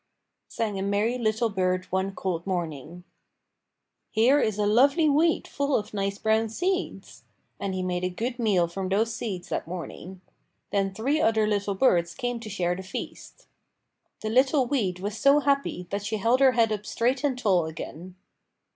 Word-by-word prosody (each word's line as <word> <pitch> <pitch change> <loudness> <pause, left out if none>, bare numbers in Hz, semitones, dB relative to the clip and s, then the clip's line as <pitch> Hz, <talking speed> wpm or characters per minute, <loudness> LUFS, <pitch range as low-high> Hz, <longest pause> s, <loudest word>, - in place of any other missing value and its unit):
sang 210 -4 -3
a - - -2
merry 205 +5 0
little 225 0 +1
bird 185 -2 0
one 190 +1 -1
cold 180 -2 -3
morning. 170 -2 -4 1.1
"Here 245 +6 +4
is 215 -6 0
a 210 - +1
lovely 275 +9 +4
weed 315 +3 +2
full 280 0 -1
of 210 - -6
nice 200 -1 -2
brown 220 +1 +1
seeds!" 365 - -3 0.4
And 195 -1 -3
he 185 - -2
made 180 0 -2
a 180 - +1
good 235 +7 -4
meal 195 -7 +2
from 185 +2 -4
those 220 +4 +1
seeds 195 -6 -5
that - - -3
morning. 180 +1 -7 0.5
Then 195 -1 +1
three 260 +10 0
other 220 -1 +3
little 205 -1 -1
birds 175 -7 +2
came 245 +2 -3
to 225 -2 -8
share 180 -3 -1
the 190 - -6
feast. 190 - -8 0.8
The 215 - -3
little 260 +3 +3
weed 220 -9 -1
was 205 +2 -4
so 280 +1 +5
happy 280 -10 0
that 200 0 -2
she 215 +1 -2
held 230 +5 +2
her 265 -2 +5
head 225 -2 +3
up 210 -1 -3
straight 250 +4 0
and 275 -4 +1
tall 185 -9 +2
again. 165 +3 -8
210 Hz, 175 wpm, -26 LUFS, 185-245 Hz, 1.1 s, so